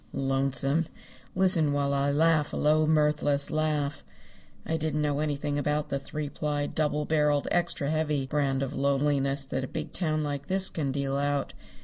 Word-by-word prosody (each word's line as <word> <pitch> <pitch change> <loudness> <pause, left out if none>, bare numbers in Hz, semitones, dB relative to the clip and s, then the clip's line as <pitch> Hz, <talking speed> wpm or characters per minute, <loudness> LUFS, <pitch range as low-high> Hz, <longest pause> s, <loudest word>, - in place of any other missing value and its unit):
Lonesome! 135 +3 +1 0.5
Listen 180 -6 +3
while 140 0 0
I 140 0 +1
laugh 155 +1 +2
a - - -2
low 155 +1 +3
mirthless 150 -2 +2
laugh. 150 -2 -1 0.6
I 160 - -1
didn't 155 -1 -1
know 145 -1 0
anything 145 -1 -1
about 150 +1 -1
the 140 - -1
three 150 +2 -5
ply, 145 0 -2
double 150 0 -1
barreled, 150 -2 +1
extra 170 -4 +1
heavy 150 -3 0
brand 135 -1 0
of 135 +1 -4
lonesomeness 140 0 +1
that 130 - -2
a - - -3
big 155 +1 -6
town 155 -3 0
like 145 -1 -4
this 190 0 +1
can 145 -4 -2
deal 140 0 -1
out. 145 0 -1
145 Hz, 165 wpm, -28 LUFS, 140-155 Hz, 0.6 s, Listen